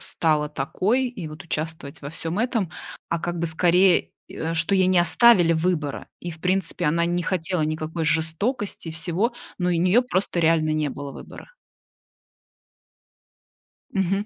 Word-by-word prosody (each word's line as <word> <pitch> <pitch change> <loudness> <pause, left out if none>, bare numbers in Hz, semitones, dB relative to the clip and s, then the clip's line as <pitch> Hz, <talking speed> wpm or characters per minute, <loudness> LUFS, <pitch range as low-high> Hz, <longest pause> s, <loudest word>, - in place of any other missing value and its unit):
стала 150 -2 0
такой 185 - 0
и 190 -9 -7
вот 155 +4 -9
участвовать 160 -3 -5
во 140 - -6
всём 165 +4 -4
этом,- 230 -7 0 0.4
а 170 - -1
как 175 +1 -4
бы 170 - 0
скорее, 175 +3 +3 0.2
э, 165 +1 -4
что 165 +4 +1
ей 185 -1 +4
не 185 -1 +3
оставили 175 -1 +6
выбора. 160 -3 -1
И 175 - -5
в 160 - -9
принципе 185 -1 -1
она 170 +3 +2
не 175 +1 0
хотела 180 -2 -1
никакой 155 +1 -2
жестокости 165 - -1
и - - -3
всего. 175 +9 -1 0.3
Но 180 0 0
у - - +2
нее 180 +7 +4
просто 190 -6 -1
реально 160 -1 +3
не 155 -2 0
было 140 0 -7
выбора. - - -12 2.4
Мгм. 195 +1 0
170 Hz, 155 wpm, -24 LUFS, 160-185 Hz, 2.4 s, оставили